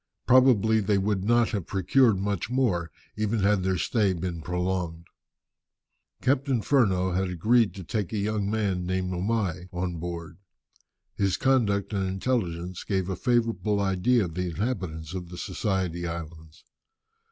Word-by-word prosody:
Probably 120 -4 +5
they 100 -1 +1
would 100 -1 0
not 120 +1 +3
have 100 -7 -3
procured 105 +3 +3
much 100 +1 -2
more, 115 -10 +1 0.3
even 110 0 0
had 100 0 +3
their 95 0 0
stay 100 +1 +1
been 85 -1 -4
prolonged. 90 -1 -2 1.2
Captain 130 -3 +1
Furneaux 95 -9 +2
had 95 +1 0
agreed 110 +6 +2
to 95 - -7
take 105 +1 -3
a 110 - -2
young 105 0 -1
man 100 -4 0
named 95 +1 -2
Omai 90 -2 -1
on 90 -1 -3
board. 85 +1 -6 0.7
His 100 -2 0
conduct 110 -7 +1
and 95 -2 0
intelligence 90 -4 -2
gave 95 -2 -1
a 95 - -1
favourable 115 -3 +1
idea 100 +4 +2
of 85 - -7
the 90 +1 -2
inhabitants 85 -5 -3
of 90 -2 -5
the 90 - -9
Society 90 -4 -2
Islands. 80 -1 -8
95 Hz, 145 wpm, -27 LUFS, 90-110 Hz, 1.2 s, Probably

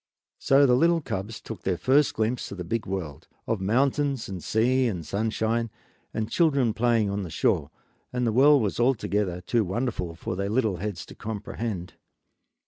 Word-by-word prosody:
So 140 +1 +5
the 125 - +4
little 170 +5 +4
cubs 105 -6 -5
took 115 - -8
their 95 -2 -1
first 135 - +3
glimpse 110 +3 -1
of 100 - -6
the 90 - -4
big 110 +6 -3
world, 90 -7 -5 0.2
of 110 -4 -1
mountains 135 +5 +1
and 95 -3 -6
sea 125 +3 +2
and 90 -8 -3
sunshine, 110 +4 -1 0.4
and 110 -1 -2
children 140 -9 +2
playing 115 -3 +2
on 100 +1 -2
the 90 - -5
shore, 70 -2 +1 0.4
and 125 0 -1
the 115 - +2
world 140 +1 +6
was 105 - -2
altogether 105 -7 +1
too 115 +5 +1
wonderful 95 -4 -2
for 85 - -4
little 100 +1 0
heads 95 -2 -4
to - - -12
comprehend. 105 -3 -5
110 Hz, 170 wpm, -26 LUFS, 95-125 Hz, 0.4 s, world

